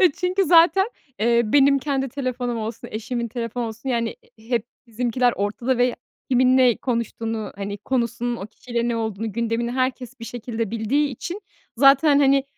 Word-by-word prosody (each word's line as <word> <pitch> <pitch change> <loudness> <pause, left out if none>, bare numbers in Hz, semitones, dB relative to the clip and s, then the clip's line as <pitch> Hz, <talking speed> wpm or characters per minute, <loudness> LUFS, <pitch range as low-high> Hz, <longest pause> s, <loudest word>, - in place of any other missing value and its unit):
E, 365 -6 +6
çünkü 365 +4 0
zaten, 355 +4 +5 0.3
eee, 235 +2 +3
benim 275 +4 +4
kendi 270 -1 -1
telefonum 250 -3 -3
olsun, 220 +1 -5
eşimin 235 +2 -3
telefon 235 +1 -4
olsun, 225 +3 -6
yani 235 -3 -1 0.2
i 220 +2 -18
hep 235 -3 +1 0.2
bizimkiler 245 +1 +1
ortada 235 +5 -1
ve 245 0 +2 0.4
kimin 255 +1 +4
ne 250 -3 +5
konuştuğunu, 225 -2 -3
hani, 200 0 -5
konusunun 240 +1 -1
o 195 - -6
kişiyle 235 +1 -3
ne 235 - 0
olduğunu 220 -1 -3
gündemini 235 +1 -1
herkes 255 -1 -2
bir - - -6
şekilde 230 -2 -4
bildiği 245 +7 +1
için 345 - -6 0.4
zaten, 280 +3 +6
hani, 275 -1 +4
240 Hz, 160 wpm, -23 LUFS, 230-265 Hz, 0.4 s, E